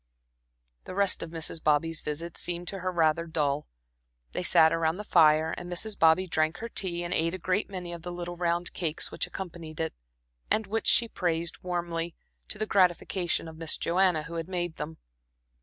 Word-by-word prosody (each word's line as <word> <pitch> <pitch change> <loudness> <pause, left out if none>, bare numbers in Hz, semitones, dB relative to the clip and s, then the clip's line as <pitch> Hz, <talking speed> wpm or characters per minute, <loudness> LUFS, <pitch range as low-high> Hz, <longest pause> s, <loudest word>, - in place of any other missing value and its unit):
The 185 - -7
rest 200 -1 +2
of 165 - -5
Mrs. 165 0 -2
Bobby's 155 +2 +2
visit 160 +3 -4
seemed 175 0 -4
to 195 - -5
her 185 0 -1
rather 165 -1 +2
dull. 150 -2 0 0.6
They - - -2
sat 160 0 +5
around 165 +1 +1
the 210 - -5
fire, 160 -4 +5
and 175 0 -7
Mrs. 205 +4 -2
Bobby 165 +3 +5
drank 160 -1 +1
her 230 +4 -5
tea 175 -5 0
and 175 +1 -2
ate 165 +2 +1
a - - -4
great 185 +3 0
many 180 -3 -5
of 170 - -7
the 175 +1 -6
little 175 0 -5
round 175 0 0
cakes 160 -3 -2
which - - -2
accompanied 165 -4 -7
it, 160 0 -1 0.6
and 220 - +2
which 220 +2 -2
she 235 - +5
praised 170 -4 -2
warmly, 170 -2 -3 0.3
to - - -5
the 215 - -1
gratification 180 -3 +1
of 160 -1 -10
Miss 165 -1 +2
Joanna, 175 -2 +2
who 165 +2 -9
had 165 0 -3
made 175 -3 -2
them. 155 +2 -5
170 Hz, 190 wpm, -28 LUFS, 160-180 Hz, 0.6 s, sat